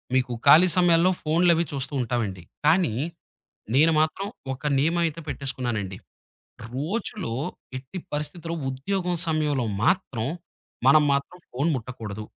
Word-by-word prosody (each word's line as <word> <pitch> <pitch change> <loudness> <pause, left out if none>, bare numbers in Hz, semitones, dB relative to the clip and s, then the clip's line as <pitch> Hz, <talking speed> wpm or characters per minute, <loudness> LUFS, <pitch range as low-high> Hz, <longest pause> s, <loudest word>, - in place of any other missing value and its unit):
మీకు 125 -1 +1
ఖాళీ 165 +6 +9
సమయాల్లో 175 0 +5
ఫోన్‌లవి 170 +2 +3
చూస్తూ 140 0 -3
ఉంటామండి. 110 -7 -2 0.2
కానీ, 160 - +4 0.8
నేను 160 +3 +5
మాత్రం 160 +5 0 0.3
ఒక 130 - -9 0.2
నియమమయితే 165 +2 +1
పెట్టేసుకున్నానండి. 120 -9 -3 0.8
రోజులో 180 - -3 0.4
ఎట్టి 135 +8 -8
పరిస్థితిలో, 150 +3 -4 0.2
ఉద్యోగం 180 +7 -2
సమయంలో 150 -5 +1 0.2
మాత్రం, 130 - +1 0.6
మనం 150 +2 +7
మాత్రం 140 +6 -2
ఫోన్ 140 +6 0
ముట్టకూడదు. 110 -4 -6
150 Hz, 105 wpm, -25 LUFS, 125-170 Hz, 0.8 s, ఖాళీ